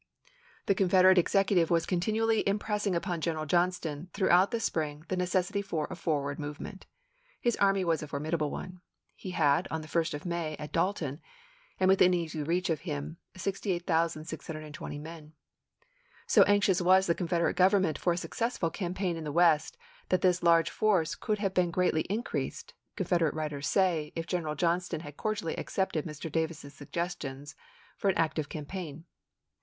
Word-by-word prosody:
The - - +3
Confederate 185 -1 +5
executive 190 -1 +2
was 170 -1 +2
continually 220 +5 +1
impressing 205 -1 -1
upon 170 -1 -2
General 155 -2 -1
Johnston, 175 -1 0
throughout 190 -1 +4
the 235 - -1
spring, 155 -6 -2
the 185 - 0
necessity 180 +2 0
for 170 -6 -3
a - - -4
forward 145 -4 -2
movement. 150 +6 -7 0.5
His 240 -1 +1
army 195 -1 +3
was 165 -2 +1
a 150 - -6
formidable 150 +2 -1
one. 180 +3 -7 0.3
He 190 - -8
had, 160 -1 +2
on 160 - -3
the - - -10
1st 165 -1 0
of 145 - -8
May, 170 -3 -2
at 150 0 -7
Dalton, 165 -5 -1 0.6
and 185 - +3
within 185 -1 +5
easy 160 -3 -3
reach 175 +4 0
of 155 - -1
him, 155 -1 -5 0.2
68,620 165 -6 -3
men.1 155 0 -10 0.9
So - - +5
anxious 200 -2 +3
was 185 +2 +5
the 170 - +2
Confederate 170 -1 0
Gov 185 +1 +6
ernment 160 -6 0
for 175 - +2
a - - -4
successful 225 -3 -2
campaign 180 -2 -2
in 165 - -6
the 150 - -4
West, 170 - +3 0.3
that 185 - +2
this 180 -1 +3
large 170 -1 +4
force 190 -7 +2
could 215 -2 -2
have 195 -2 -1
been 180 -2 +2
greatly 170 -2 +1
in 215 +4 -1
creased, - - -4 0.2
Confederate 165 -5 +1
writers 150 -2 -3
say, 170 -6 +1
if 165 - -3
General 165 -4 -2
John 170 +3 +2
ston 170 -3 -5
had 145 -3 -10
cordially 210 -5 -2
accepted 190 -5 -1
Mr. 155 0 -6
Davis's 160 -2 -3
suggestions 145 -3 -5 0.4
for 200 - +1
an 190 - +1
active 155 -2 0
campaign. 160 0 -6
170 Hz, 165 wpm, -30 LUFS, 155-185 Hz, 0.9 s, Gov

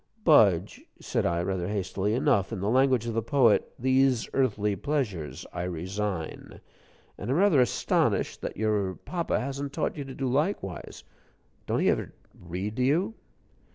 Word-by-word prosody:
"Budge," 100 - +4 0.2
said - - -1
I, 85 0 0
rather 90 -1 -2
hastily, 100 +1 -1
"enough. 130 -8 +2
In - - -4
the 100 +3 0
language 130 -2 +3
of 115 - -3
the 115 - 0
poet 115 -2 +3
"'These 130 -1 +2
earthly 105 -6 +1
pleasures 105 - -3
I 85 - -3
resign,' 90 +1 -4 0.6
and 100 - -5
I'm 135 - +2
rather 180 -8 +5
astonished 125 - +1
that - - -5
your 105 -3 0
papa 175 -2 -2
hasn't 140 +2 -4
taught - - -1
you 145 - -3
to 135 - -8
do 135 - -2
likewise. 130 - -2 0.6
Don't - - 0
he - - +3
ever - - -3 0.2
read 90 +5 -6
to 125 - +1
you?" 165 - +2
110 Hz, 155 wpm, -27 LUFS, 95-135 Hz, 0.6 s, rather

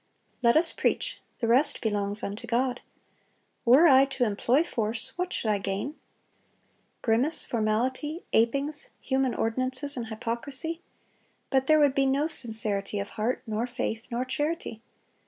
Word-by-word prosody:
Let 235 +3 +4
us 330 +1 +4
preach; - - -1 0.2
the 230 - +1
rest 255 +6 +3
belongs 205 -2 -2
unto 210 +4 -5
God. 245 +2 0 0.8
Were 260 +8 +7
I 270 -4 +7
to 270 -2 -2
employ 240 +6 +2
force, 225 -7 -1
what 360 0 -3
should 215 - -1
I 205 - +1
gain? 195 +8 -3 1.1
Grimace, 245 +7 +2
formality, 255 +8 -1
apings, 275 +6 +2
human 265 -2 0
ordinances, 255 +5 -1
and 240 -3 -4
hypocrisy.... 260 +9 -2 0.7
But 265 -1 +2
there 310 0 +5
would 290 -3 +4
be 270 0 +2
no 275 +3 +1
sincerity 220 -9 0
of 200 - -4
heart, 225 +4 -2
nor 220 +1 -2
faith, 225 -2 -4
nor 245 +2 -2
charity. 290 -4 -3
250 Hz, 140 wpm, -27 LUFS, 225-280 Hz, 1.1 s, Were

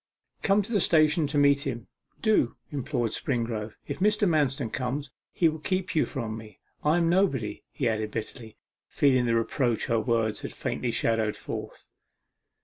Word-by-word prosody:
Come 200 +1 +3
to 220 - -8
the 210 - +3
station 155 -2 +4
to 145 +1 -1
meet 140 -1 +4
him 120 -4 -4 0.4
do,' 215 - +3 0.2
implored 120 -5 -1
Springrove. 115 -4 -2
'If - - -5
Mr. 210 +1 +3
Manston 140 -7 +1
comes, 130 +2 -3 0.2
he 170 - +3
will 160 0 -2
keep 185 +2 -2
you 155 - +2
from 115 -6 -4
me: 110 -1 -11 0.2
I 150 +3 +3
am 170 -1 +2
nobody,' 140 - +1
he 130 - -1
added 110 -1 -1
bitterly, 110 +1 -7 0.3
feeling 130 -4 +3
the 115 - +2
reproach 115 0 0
her 115 -1 +1
words 110 -1 0
had - - -6
faintly 125 - -2
shadowed 115 -2 +1
forth. - - -7
130 Hz, 165 wpm, -27 LUFS, 115-155 Hz, 0.4 s, station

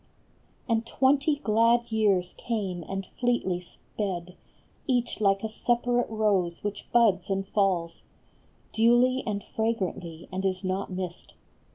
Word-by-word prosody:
And 225 -2 +1
twenty 275 +5 +2
glad 230 +2 +3
years 200 -5 +2
came 200 -7 -3
and 195 0 -3
fleetly 240 -6 -1
sped. 180 0 -6 0.5
Each 245 -4 0
like 195 0 +3
a - - 0
separate 240 +2 0
rose 200 -6 0
which 205 0 -5
buds 205 -6 +3
and 195 0 -1
falls 190 -5 0 0.7
Duly 240 +3 +4
and 205 -2 -2
fragrantly 185 -7 -2
and 190 +1 -3
is 190 0 -1
not 190 +1 -2
missed. 180 -1 -6
205 Hz, 125 wpm, -27 LUFS, 185-235 Hz, 0.7 s, Duly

